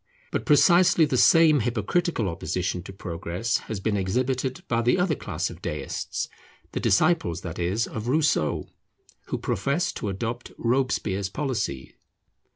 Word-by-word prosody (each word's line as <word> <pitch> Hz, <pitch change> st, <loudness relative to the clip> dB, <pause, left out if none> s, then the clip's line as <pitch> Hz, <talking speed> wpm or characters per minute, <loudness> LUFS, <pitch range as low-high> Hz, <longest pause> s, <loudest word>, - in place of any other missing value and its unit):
But -, -, -3 dB
precisely 170 Hz, +3 st, +5 dB
the 145 Hz, -3 st, -1 dB
same 160 Hz, +2 st, +6 dB
hypocritical 120 Hz, -, 0 dB
opposition 90 Hz, +1 st, -2 dB
to -, -, -7 dB
progress 90 Hz, +3 st, -2 dB
has 110 Hz, -, -3 dB
been 105 Hz, +2 st, 0 dB
exhibited 130 Hz, +7 st, -1 dB
by 115 Hz, 0 st, +1 dB
the 120 Hz, +8 st, +3 dB
other 180 Hz, -2 st, +2 dB
class -, -, -3 dB
of -, -, -12 dB
Deists, -, -, -3 dB, 0.4 s
the -, -, -3 dB
disciples, 95 Hz, -, +2 dB
that 85 Hz, -1 st, -6 dB
is, 95 Hz, +6 st, 0 dB
of 110 Hz, +1 st, -6 dB
Rousseau, 145 Hz, -, +1 dB, 0.6 s
who -, -, -2 dB
profess 140 Hz, -, -1 dB
to 105 Hz, -, -4 dB
adopt 115 Hz, +5 st, -4 dB
Robespierre's 115 Hz, -6 st, 0 dB
policy. 105 Hz, -, -3 dB
115 Hz, 140 wpm, -25 LUFS, 95-145 Hz, 0.6 s, same